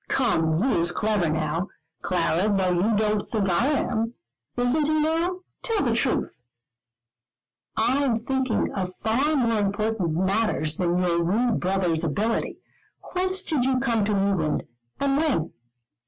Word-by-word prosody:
Come, 165 -9 +1
he 255 -8 +2
is 170 +1 +3
clever 205 -3 0
now, 160 +4 -1 0.3
Clara, 180 +2 +1
though 190 -2 +1
you 190 +6 +2
don't 210 0 +1
think 210 -3 -2
I 175 +10 +2
am. 240 -5 -1 0.4
Isn't 250 +5 +2
he 310 0 +2
now? 330 +4 0 0.2
Tell 450 -4 0
the 235 - +2
truth." 245 - -1 1.4
"I 255 +6 +2
am 245 -4 +2
thinking 260 +1 -1
of 185 -2 -3
far 265 +8 +1
more 230 -5 +1
important 205 -4 -1
matters 190 -4 0
than 175 -1 +1
your 175 -2 +1
rude 220 +7 +1
brother's 180 -3 0
ability. 205 +9 -1 0.6
Whence 375 +1 +1
did 295 -6 +1
you 260 0 +1
come 235 -5 +1
to 205 -1 0
England 195 -6 0 0.4
and 275 0 +1
when?" 285 - 0
215 Hz, 145 wpm, -25 LUFS, 180-260 Hz, 1.4 s, is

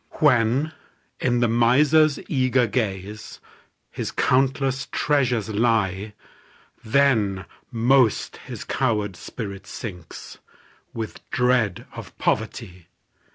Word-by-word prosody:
When, 135 +1 +3 0.5
in 120 -1 +1
the 120 - +4
miser's 140 +6 +4
eager 130 -3 +2
gaze, 105 -2 -4 0.5
His - - -4
countless 135 0 +1
treasures 125 -7 +1
lie, 105 -2 0 0.7
Then 110 -7 +2 0.2
most 120 0 +2
his - - -8
coward 105 -7 -1
spirit 100 -2 -7
sinks, 90 -7 -9 0.5
With 110 -2 -6
dread 125 -6 +1
of - - -10
poverty. 90 -2 -2
120 Hz, 90 wpm, -23 LUFS, 105-130 Hz, 0.7 s, the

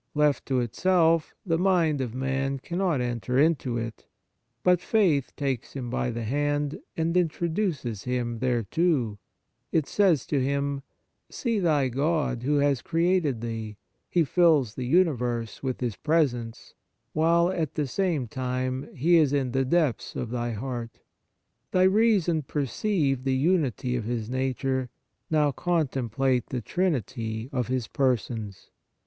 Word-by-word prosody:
Left 150 -1 +2
to 130 -2 +1
itself, 165 - +2
the 165 -3 +1
mind 170 -6 +2
of 125 -2 -4
man 135 +1 -1
cannot 170 0 -1
enter 125 +1 -2
into 140 -5 +2
it; 115 -1 -6 0.6
but 180 -1 +4
faith 175 - +2
takes 135 -4 -3
him 125 -4 -5
by 125 - -1
the 120 -1 -4
hand 145 +4 -1 0.2
and 165 +1 0
introduces 165 - -1
him 120 -2 -2
thereto. 125 - 0 0.5
It 160 -3 +2
says 180 -9 +2
to 140 -3 0
him: 140 +1 -1 0.2
" - - -51
See 230 -4 0
thy 150 -7 +2
God 140 -1 0
who 145 +4 +1
has 140 -3 +2
created 165 -7 +1
thee; 110 -2 -5 0.3
He 175 - +3
fills 155 - +3
the 125 0 -4
uni 170 +4 +4
verse 120 -3 -3
with 130 -2 -3
His 120 -6 -2
presence, 130 -8 -1 0.4
while, 170 +3 +3
at 160 -6 -2
the 150 - 0
same 155 -3 -1
time, 130 +2 -3
He 170 +6 +4
is 150 -4 +4
in 135 -3 0
the 135 +1 +1
depths 150 -1 0
of 120 -2 -4
thy 120 -1 -2
heart. 120 0 -5 0.7
Thy 185 - +3
reason 190 -5 +3
perceived 140 - -1
the 135 -1 +1
unity 135 - +1
of 115 -3 -2
His 115 -1 -3
nature; 130 0 -1 0.4
now 150 -2 +3
contemplate 135 -6 0
the 125 - -3
Trinity 115 - -2
of 125 -3 -1
His 125 -3 -1
Persons. 115 -6 -2
135 Hz, 145 wpm, -26 LUFS, 125-165 Hz, 0.7 s, but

